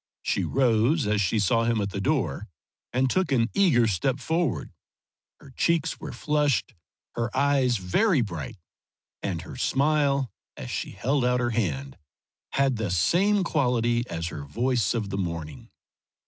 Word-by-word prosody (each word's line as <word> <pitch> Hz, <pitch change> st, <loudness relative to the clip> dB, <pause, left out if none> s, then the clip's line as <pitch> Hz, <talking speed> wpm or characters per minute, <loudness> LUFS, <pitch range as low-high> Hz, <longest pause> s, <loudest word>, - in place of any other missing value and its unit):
She -, -, 0 dB
rose 125 Hz, +3 st, +2 dB
as 105 Hz, 0 st, +1 dB
she 100 Hz, +3 st, +1 dB
saw 115 Hz, +3 st, +2 dB
him 115 Hz, -1 st, +1 dB
at 100 Hz, -1 st, -2 dB
the 100 Hz, -, -3 dB
door 135 Hz, -4 st, -1 dB, 0.4 s
and 130 Hz, +2 st, +2 dB
took 185 Hz, +5 st, 0 dB
an 120 Hz, -3 st, +2 dB
eager 165 Hz, -12 st, +4 dB
step 110 Hz, +6 st, 0 dB
forward. 160 Hz, 0 st, -1 dB, 0.7 s
Her 135 Hz, -, -15 dB
cheeks 165 Hz, +4 st, 0 dB
were -, -, -6 dB
flushed, 150 Hz, -, 0 dB, 0.4 s
her 115 Hz, 0 st, -2 dB
eyes 135 Hz, -3 st, +3 dB
very 140 Hz, -, +2 dB
bright, 85 Hz, -, -5 dB, 0.6 s
and -, -, -3 dB
her -, -, -9 dB
smile, 140 Hz, -2 st, +1 dB, 0.3 s
as -, -, -7 dB
she -, -, -3 dB
held 135 Hz, +2 st, 0 dB
out 125 Hz, 0 st, +2 dB
her 120 Hz, -1 st, 0 dB
hand, 70 Hz, -, -2 dB, 0.5 s
had 135 Hz, -3 st, +2 dB
that 105 Hz, -5 st, -2 dB
same 195 Hz, -, +3 dB
quality 120 Hz, -7 st, +1 dB
as 85 Hz, 0 st, -3 dB
her 75 Hz, -, -7 dB
voice 120 Hz, -, 0 dB
of 105 Hz, -4 st, -2 dB
the 100 Hz, -, -2 dB
morning. 85 Hz, -5 st, -5 dB
120 Hz, 155 wpm, -26 LUFS, 100-140 Hz, 0.7 s, eager